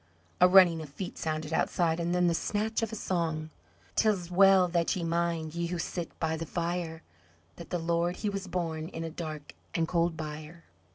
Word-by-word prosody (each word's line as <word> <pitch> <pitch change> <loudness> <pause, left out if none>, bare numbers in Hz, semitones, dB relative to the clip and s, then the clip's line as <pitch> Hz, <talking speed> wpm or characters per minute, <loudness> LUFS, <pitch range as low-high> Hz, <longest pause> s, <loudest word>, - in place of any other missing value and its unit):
A 180 - +8
running 180 -3 +6
of 155 - -8
feet 175 +6 -7
sounded 155 0 -3
outside, 165 0 +1
and 170 0 -1
then 180 0 +3
the 170 - +3
snatch 215 +6 -1
of 225 -1 -2
a - - -4
song 160 -5 -2 0.4
"'Tis 190 -5 +1
well 190 0 +6
that 170 -1 +1
ye 180 - -3
mind 165 -1 -1
ye 170 0 -2
who 175 +1 -3
sit 170 0 -5
by 160 0 0
the 165 0 -5
fire 170 -1 -3 0.5
That 170 - -10
the 180 - -1
Lord 170 +1 0
he 210 - -3
was 195 -1 -3
born 165 -3 -2
in 165 -1 -6
a 165 - -4
dark 155 -3 -6 0.2
and 165 -1 +1
cold 170 -1 +1
byre. 155 +2 -7
170 Hz, 195 wpm, -29 LUFS, 160-180 Hz, 0.5 s, A